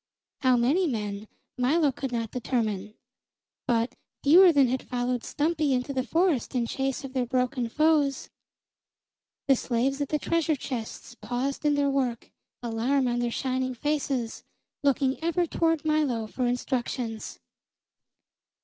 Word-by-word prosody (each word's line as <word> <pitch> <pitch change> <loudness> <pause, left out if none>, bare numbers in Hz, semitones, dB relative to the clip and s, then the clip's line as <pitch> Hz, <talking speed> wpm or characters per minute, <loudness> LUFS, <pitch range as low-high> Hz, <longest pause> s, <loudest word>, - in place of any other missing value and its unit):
How 255 -3 +4
many 295 +10 +2
men 210 -4 -3 0.3
Milo 290 +4 +3
could 265 0 -5
not 230 -2 -2
determine; 215 -4 -2 0.7
but 230 0 +1 0.3
fewer 350 +5 +8
than 280 -4 +4
had 255 +1 -1
followed 245 -1 -2
Stumpy 305 -2 0
into 250 +2 -1
the 260 - 0
forest 320 -2 +1
in 240 -2 +1
chase 270 +3 -2
of 265 -1 -7
their 255 -2 0
broken 250 -1 0
foes. 295 -1 +2 1.2
The 270 - +6
slaves 260 +3 -1
at 285 - -2
the 305 - +1
treasure 325 0 +1
chests 240 -4 -6
paused 255 +5 -3
in 295 -1 +4
their 285 -1 +2
work, 255 -4 -1 0.3
alarm 245 +4 +1
on 240 0 0
their 240 0 0
shining 255 +1 -2
faces, 275 -4 -2 0.4
looking 275 0 +1
ever 340 +1 +1
toward 325 -1 0
Milo 295 -8 +1
for 245 +3 -2
instructions. 245 -2 -3
260 Hz, 140 wpm, -27 LUFS, 240-290 Hz, 1.2 s, fewer